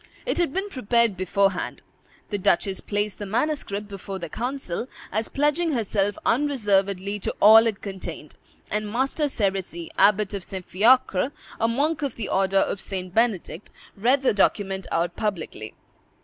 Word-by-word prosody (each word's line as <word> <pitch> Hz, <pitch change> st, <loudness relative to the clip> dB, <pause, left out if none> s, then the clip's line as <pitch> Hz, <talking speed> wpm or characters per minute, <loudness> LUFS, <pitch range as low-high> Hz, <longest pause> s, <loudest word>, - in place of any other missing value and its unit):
It -, -, -1 dB
had 345 Hz, -5 st, +1 dB
been 385 Hz, +6 st, -2 dB
prepared 235 Hz, -, +1 dB
beforehand; 190 Hz, +1 st, 0 dB, 0.5 s
the 205 Hz, -, -1 dB
duchess 190 Hz, +1 st, +1 dB
placed 205 Hz, -1 st, -2 dB
the 205 Hz, -, -5 dB
manuscript 210 Hz, -3 st, -1 dB
before 195 Hz, -1 st, -7 dB
the 170 Hz, -3 st, -6 dB
council, 245 Hz, -, -3 dB, 0.2 s
as 220 Hz, +3 st, -1 dB
pledging 295 Hz, +3 st, +1 dB
herself 205 Hz, -4 st, 0 dB
unreservedly 205 Hz, -7 st, +1 dB
to -, -, -3 dB
all 220 Hz, +2 st, +8 dB
it 215 Hz, -3 st, -3 dB
contained, 180 Hz, -6 st, -7 dB, 0.4 s
and 210 Hz, 0 st, -2 dB
Master 270 Hz, +6 st, 0 dB
Serisy, 190 Hz, -, -2 dB
Abbot 210 Hz, 0 st, +4 dB
of 195 Hz, -2 st, -4 dB
St. 185 Hz, -1 st, -6 dB
Fiacre, 230 Hz, +2 st, +3 dB, 0.3 s
a 225 Hz, -, +2 dB
monk 290 Hz, +7 st, 0 dB
of 280 Hz, -4 st, -2 dB
the 225 Hz, -, -5 dB
order 195 Hz, 0 st, +2 dB
of 195 Hz, 0 st, +1 dB
St. 185 Hz, -2 st, -5 dB
Benedict, 210 Hz, -5 st, 0 dB, 0.3 s
read 255 Hz, +7 st, +2 dB
the 260 Hz, -, +3 dB
document 195 Hz, -1 st, +1 dB
out 170 Hz, +1 st, 0 dB
publicly. 175 Hz, -, -4 dB
205 Hz, 150 wpm, -24 LUFS, 190-240 Hz, 0.5 s, all